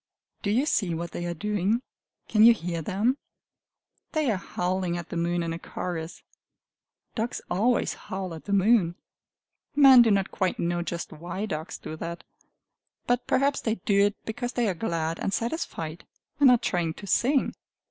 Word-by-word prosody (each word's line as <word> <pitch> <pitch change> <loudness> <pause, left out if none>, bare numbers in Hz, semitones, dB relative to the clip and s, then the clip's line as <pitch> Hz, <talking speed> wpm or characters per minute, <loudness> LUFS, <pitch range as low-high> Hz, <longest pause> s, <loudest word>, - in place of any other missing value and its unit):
Do 200 - -2
you 245 +7 +2
see 190 - +1
what 170 +1 -4
they 175 - -4
are 170 - -3
doing? 210 +4 0 0.5
Can 215 -1 +4
you 235 0 +9
hear 170 -4 -4
them? 215 - 0 0.9
They 305 -6 +2
are 205 - 0
howling 180 -1 -2
at 175 - -7
the - - -5
moon 170 +1 0
in 165 0 -2
a 165 - -5
chorus. 170 -2 -5 0.9
Dogs 230 +1 -2
always 225 +7 +2
howl 190 -2 -6
at 160 - -10
the 205 - -5
moon. 200 -3 +4 0.8
Men 270 -3 +9
do 235 - +5
not 195 -2 +2
quite 185 -1 -1
know 175 0 -1
just 170 0 -4
why 175 +6 -5
dogs 155 -5 -5
do 155 - -7
that. 170 +2 -6 0.8
But 245 0 0
perhaps 275 +1 +2
they 220 -1 0
do 200 0 +3
it 205 - -4
because 245 +2 -4
they 240 -3 +1
are 195 - +1
glad 165 -4 -2
and - - -1
satisfied, 175 - -4 0.3
and 280 -2 +7
are 250 - +7
trying 175 -6 -1
to 205 - -9
_sing! 260 +7 +2
190 Hz, 175 wpm, -27 LUFS, 170-230 Hz, 0.9 s, you